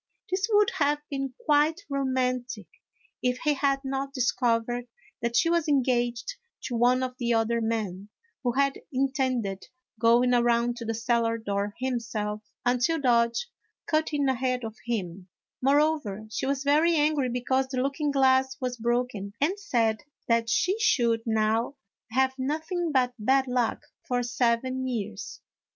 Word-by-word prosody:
This 380 +3 0
would 415 -1 +4
have 295 0 +3
been 270 -2 -3
quite 300 +2 +3
romantic 255 -5 -1 0.6
if 250 0 +1
he 300 -2 +3
had 275 -1 +1
not 270 +1 -3
discovered 240 -1 0 0.3
that 235 0 -1
she 330 - +4
was 335 -1 +1
engaged 255 - 0 0.3
to 245 - -3
one 250 +2 +3
of 255 -1 -3
the 240 -1 +1
other 230 +1 +1
men, 210 -4 -3 0.3
who 245 -2 +1
had 275 +1 +1
intended 255 -7 -1 0.3
going 240 +2 +4
around 240 0 +2
to 235 - -6
the 225 0 -2
cellar 230 0 +1
door 205 -2 -3
himself, 225 -4 -3 0.2
until 250 +7 +2
Dodge 235 - +2 0.4
cut 310 0 0
in 290 -2 +1
ahead 255 -1 0
of 220 -1 -5
him; 190 -5 -3 0.3
moreover, 275 -7 +1
she 265 - -2
was 275 0 -1
very 310 +4 +4
angry 295 -3 +2
because 260 +2 0
the 260 -1 -5
looking 280 +3 0
glass 265 -1 +3
was 250 -2 -3
broken, 235 -4 -1
and 360 +8 +1
said 225 - 0 0.3
that 230 -1 +2
she 375 - +1
should 235 - +2
now 220 +4 +1 0.4
have 260 +2 +2
noth 305 +6 -3
ing 350 -3 0
but 255 -3 +2
bad 265 +5 +3
luck 245 -3 -1 0.2
for 245 -1 0
seven 245 +2 0
years. 215 -4 -5
250 Hz, 150 wpm, -27 LUFS, 230-275 Hz, 0.6 s, would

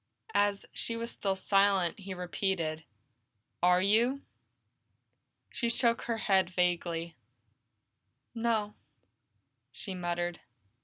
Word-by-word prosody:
As 205 0 +2
she 230 - -2
was 230 +1 -3
still 195 -1 -1
silent, 195 -1 +2
he 195 -1 -6
repeated, 175 -3 -2 0.8
"Are 180 +1 +4
you?" 235 +7 +3 1.3
She 235 - -1
shook 235 0 +2
her 230 -1 -1
head 190 -4 +2
vaguely. 170 -2 0 1.2
"No," 225 -3 0 1.0
she 195 - -6
muttered. 175 -1 -2
195 Hz, 95 wpm, -31 LUFS, 175-220 Hz, 1.3 s, Are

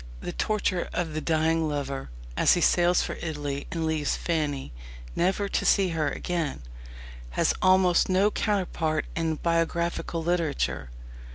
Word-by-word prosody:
The - - -5
torture 200 -4 0
of 165 -3 -2
the 155 - -2
dying 160 0 +1
lover, 140 - -3 0.3
as - - +5
he - - 0
sails 175 +1 +4
for - - -4
Italy 145 -3 -4
and 165 -2 -2
leaves 160 -2 0
Fanny, 150 - -2 0.4
never 190 +3 +1
to - - 0
see 195 -2 +4
her 160 -3 0
again, 165 - -3 0.7
has - - +3
almost 185 -1 +4
no 195 +3 +3
counterpart 175 -8 0
in 165 -1 0
biographical 170 0 -1
literature. 160 - -1
165 Hz, 140 wpm, -27 LUFS, 155-180 Hz, 0.7 s, as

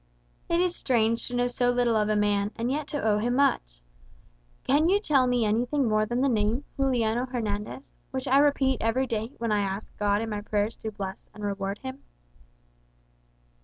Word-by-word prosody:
"It 340 - +2
is 360 0 +1
strange 230 -3 +1
to 245 - -4
know 245 0 +2
so 245 0 0
little 245 -2 +2
of 210 -1 +1
a 215 - +2
man, 205 -1 +1
and 235 +2 -2
yet 295 +1 -2
to 290 - -3
owe 210 -1 +2
him 240 +3 0
so - - 0
much. - - +1 0.8
Can 300 +5 +3
you 400 +2 +4
tell 280 -10 +3
me 245 -2 +2
anything 240 +6 +1
more 215 0 +2
than 240 +3 -1
the 275 - +3
name, 225 +2 +1
Juliano 245 -3 +1
Hernandez, 220 0 -4 0.2
which 260 +1 -4
I 270 +2 +5
repeat 275 -3 +2
every 235 +4 +1
day 225 +1 -3
when 230 -1 -2
I 210 - +2
ask 195 +1 -4
God 205 +1 +1
in 225 - -4
my 205 -1 -3
prayers 210 +1 -1
to 220 - -5
bless 195 -2 -7
and 210 - -9
reward 200 0 -2
him?" 265 +1 -7
230 Hz, 200 wpm, -27 LUFS, 210-265 Hz, 0.8 s, I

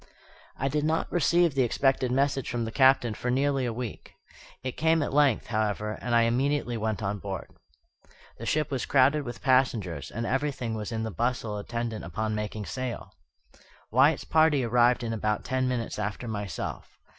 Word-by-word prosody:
I 135 - -1
did 150 +2 0
not 160 +1 0
receive 175 -1 +3
the 135 - +2
expected 130 +1 +1
message 135 0 +1
from 120 -1 -2
the 110 - -4
Captain 130 -3 +4
for 125 - -4
nearly 135 0 +1
a - - -1
week. 120 -1 -7 0.5
It 130 - -2
came 160 +3 +2
at 145 - -4
length, 140 -5 +3
however, 105 -1 -1
and 120 -1 0
I 115 - +5
immediately 125 +2 0
went 110 -1 -2
on 100 +1 -2
board. 95 -2 -6 0.9
The 115 - -6
ship 150 -2 0
was 130 -3 -2
crowded 140 +2 +4
with 120 -4 -8
passengers, 125 -9 +1
and 115 +1 -4
everything 130 -3 -1
was 110 0 -4
in 110 -1 -2
the 110 - -3
bustle 115 +1 -2
attendant 115 0 -4
upon 110 0 -3
making 105 0 -4
sail. 120 -5 -5 0.8
Wyatt's 135 +6 +4
party 155 -4 +3
arrived 120 +1 +3
in 115 -1 -2
about 105 -1 -1
ten 130 0 0
minutes 120 -4 -2
after 105 +3 -3
myself. 105 -3 -5
120 Hz, 175 wpm, -27 LUFS, 110-135 Hz, 0.9 s, I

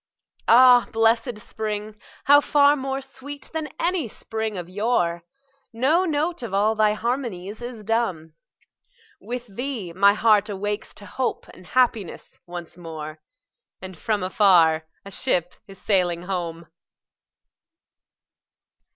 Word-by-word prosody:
Ah, 245 +1 +7
blessed 225 +1 +2
spring!—how 215 +6 0
far 290 0 +4
more 270 -1 -3
sweet 270 +2 -9
than 315 -1 -3
any 345 -6 0
spring 220 -1 -5
of 175 -2 -5
yore! 180 -4 0 0.5
No 280 +10 +2
note 320 0 -1
of 225 -5 -4
all 210 +2 +3
thy 215 -1 +3
harmonies 220 -4 -4
is 240 -3 -7
dumb; 190 -8 -1 0.9
With 240 +4 -6
thee 225 -4 -5
my 200 +3 +5
heart 215 -1 +3
awakes 205 +1 -4
to 205 - -11
hope 260 +4 -3
and 185 -1 -15
happiness 230 -6 -1
once 175 -1 -8
more, 155 -2 -8 0.6
And 185 0 -9
from 210 +3 -2
afar 170 -5 +4 0.2
a 200 - -9
ship 180 -7 0
is 195 -1 -13
sailing 180 -4 +1
home! 170 -3 -4
215 Hz, 120 wpm, -23 LUFS, 185-250 Hz, 0.9 s, Ah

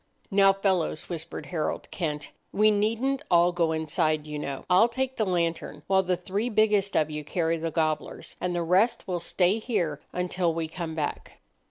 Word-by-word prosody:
"Now, 195 0 +6
fellows," 190 -5 -1
whispered 165 -1 -5
Harold 165 -4 -3
Kent, 150 -4 -3 0.2
"we 215 +1 +4
needn't 230 +7 0
all 175 0 +5
go 170 -2 +1
inside, 155 -1 0
you 150 -1 -5
know. 140 -2 -5
I'll 185 +5 +5
take 260 +2 -2
the 220 - +1
lantern, 170 -4 -1
while 190 0 +3
the 180 -1 0
three 205 +7 -2
biggest 210 -2 +2
of 155 0 +1
you 150 0 -4
carry 165 +1 -1
the 165 +1 -2
gobblers, 155 -1 -2
and 180 -1 -1
the 170 - 0
rest 185 +8 +2
will 180 -2 -1
stay 180 +4 +1
here 175 - -1
until 180 -2 -1
we 165 -1 -2
come 165 -1 -5
back." 150 -2 -3
175 Hz, 180 wpm, -27 LUFS, 160-200 Hz, 0.2 s, Now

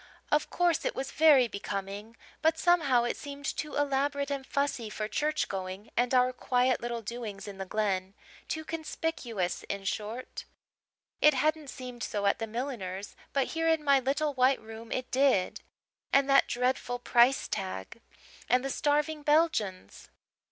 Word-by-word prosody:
Of 300 0 +2
course, 350 -3 +1
it - - -1
was 270 0 -4
very 295 -6 +6
becoming; 200 +1 -5 0.2
but 320 0 +3
somehow 300 -9 +3
it 240 - -1
seemed 285 -1 -8
too 300 +1 -3
elaborate 280 0 0
and 275 -1 -2
fussy 280 -5 -1
for 215 0 -3
church 300 +7 0
going 190 +1 -6
and 245 +1 +2
our 255 0 +4
quiet 250 0 +1
little 235 -1 -3
doings 215 -2 -6
in 195 -1 -8
the 190 - -4
Glen 195 -2 -1 0.3
too 315 0 -3
conspicuous, 305 - -3
in 200 0 -3
short. 215 +5 -4 0.8
It 300 -1 +6
hadn't 305 +1 0
seemed 250 -2 -8
so 205 -2 -2
at 200 - +2
the 225 - -3
milliner's 215 -5 -5 0.2
but 275 -2 +1
here 325 0 -1
in 320 -2 +2
my 280 -2 +5
little 285 +3 0
white 260 +1 +3
room 225 +1 -10
it 255 0 -3
did. 260 -8 +2 0.5
And 275 0 +4
that 275 0 +5
dreadful 250 0 0
price 245 +2 +3
tag! 185 - -5 0.5
And 250 +1 +3
the 270 - -1
starving 300 +2 +1
Belgians! 295 - 0
255 Hz, 160 wpm, -30 LUFS, 215-290 Hz, 0.8 s, very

